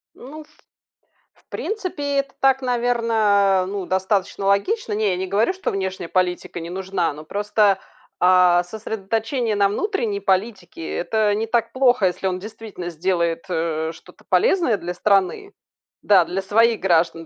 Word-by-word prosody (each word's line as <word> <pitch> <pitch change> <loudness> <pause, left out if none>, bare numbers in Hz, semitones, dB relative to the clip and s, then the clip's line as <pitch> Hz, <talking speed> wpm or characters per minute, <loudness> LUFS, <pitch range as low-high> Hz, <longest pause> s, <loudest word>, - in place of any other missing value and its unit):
Ну 300 +5 -10
в - - -27 0.9
в - - -31
принципе 325 -10 -3
это 275 0 -4
так, 270 0 +3
наверно, 225 -6 +2
ну 195 -1 -4
достаточно 190 +1 -1
логично. 215 - +1
Не, 210 -1 +1
я 180 - -1
не 190 - -2
говорю, 205 - +1
что 380 - -3
внешняя 190 -3 -4
политика 180 -1 -1
не 165 0 -7
нужна, 185 -2 -2
но 150 +1 -10
просто, 205 +2 +1 0.4
а, 180 -1 +5
сосредоточение 220 +3 -3
на 200 -1 +3
внутренней 230 - -2
политике- 190 -3 -2
это 215 +2 +1
не 220 +2 -2
так 235 0 0
плохо, 250 -6 +3
если 180 +1 -2
он 185 -1 -2
действительно 210 -3 -8
сделает, 170 0 -1
э, 160 -2 -1
что-то - - -18
полезное 360 - +2
для 175 -1 -5
страны, 200 - 0 0.5
да, 190 -4 +5
для 185 +4 -3
своих 225 +3 +2
граждан, 165 -2 +1
200 Hz, 150 wpm, -21 LUFS, 180-230 Hz, 0.9 s, а